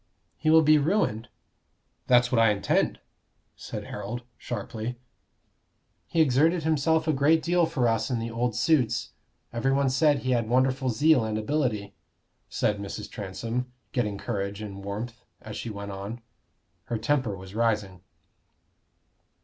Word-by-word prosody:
"He 155 - -1
will 160 0 +7
be 155 0 +6
ruined." 140 - 0 0.8
"That's 125 -1 +4
what 120 -3 +4
I 115 - +6
intend," 100 -1 +1 0.6
said - - -6
Harold, 120 +2 -6
sharply. 115 +1 -5 1.1
"He 165 - +2
exerted 160 +4 +3
himself 160 +1 +2
a 155 - +3
great 150 +3 +3
deal 175 0 +3
for 135 -7 +1
us 115 +2 +1
in 125 - 0
the 115 0 -4
old 120 0 -1
suits: 125 -6 +1 0.4
everyone 135 +3 +1
said 145 +2 +3
he 130 - 0
had 115 -3 +1
wonderful 130 +1 +2
zeal 130 +2 +4
and 110 -1 -2
ability," 110 -4 -1 0.6
said 105 -1 0
Mrs. 100 -1 -6
Transome, 115 +5 -4 0.2
getting 105 -5 -1
courage 100 -2 -3
and 100 -2 -7
warmth, 115 +4 -5 0.2
as 110 -1 -9
she 120 - -5
went 100 -1 -6
on. 100 +5 -6 0.6
Her 120 - -2
temper 115 -3 0
was 95 +1 -11
rising. 105 -5 0
120 Hz, 140 wpm, -27 LUFS, 110-140 Hz, 1.1 s, will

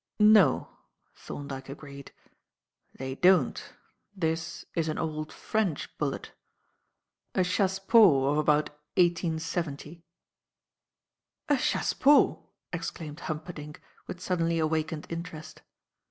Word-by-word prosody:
"No," 210 - +5 0.4
Thorndyke 135 -2 -8
agreed. 140 -1 -10 0.8
"They 130 0 -6
don't. 180 -1 +2 0.4
This 165 -2 -2
is 165 -1 0
an 155 - -2
old 155 -1 -3
French 205 -9 -2
bullet; - - -3 1.0
a 185 - +3
chassepot 190 - +4
of 150 - +1
about 150 0 +2 0.3
1870." 165 -2 -1 1.5
"A - - +5
chassepot!" 280 +2 +3 0.3
exclaimed 165 -2 -5
Humperdinck, 155 -1 -6 0.3
with 180 - -7
suddenly 170 -2 0
awakened 155 -1 -1
interest. 165 -2 -7
160 Hz, 90 wpm, -28 LUFS, 150-180 Hz, 1.5 s, No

